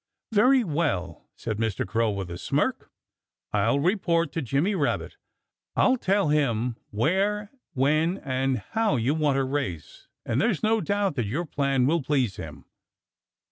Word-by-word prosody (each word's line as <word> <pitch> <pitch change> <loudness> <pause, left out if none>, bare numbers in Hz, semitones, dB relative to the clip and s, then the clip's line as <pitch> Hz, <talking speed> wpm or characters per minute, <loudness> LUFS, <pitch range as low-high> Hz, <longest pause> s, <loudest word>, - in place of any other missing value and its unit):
"Very 250 +5 +5
well!" 145 - -2
said 110 -2 -4
Mr. 110 -3 -1
Crow 115 +3 +1
with 100 -4 -4
a 85 - -5
smirk, - - -1 0.6
"I'll 110 +6 +2
report 170 -2 +1
to 165 - -2
Jimmy 140 - 0
Rabbit. 150 -7 -1 0.6
I'll 260 - +4
tell 200 - +1
him 125 -5 +1
where, 195 - 0 0.2
when 155 +7 +2
and 130 -4 -1
how 220 -8 +2
you 125 +4 +1
want 150 -3 +1
to 135 - +2
race, 130 - -4 0.2
and 120 +5 0
there's 220 -6 0
no 220 0 +3
doubt 200 -3 0
that 120 -4 0
your 150 +12 -2
plan 140 -4 +1
will 165 +4 +2
please 130 -8 0
him." 75 -4 -9
145 Hz, 150 wpm, -26 LUFS, 115-185 Hz, 0.6 s, Very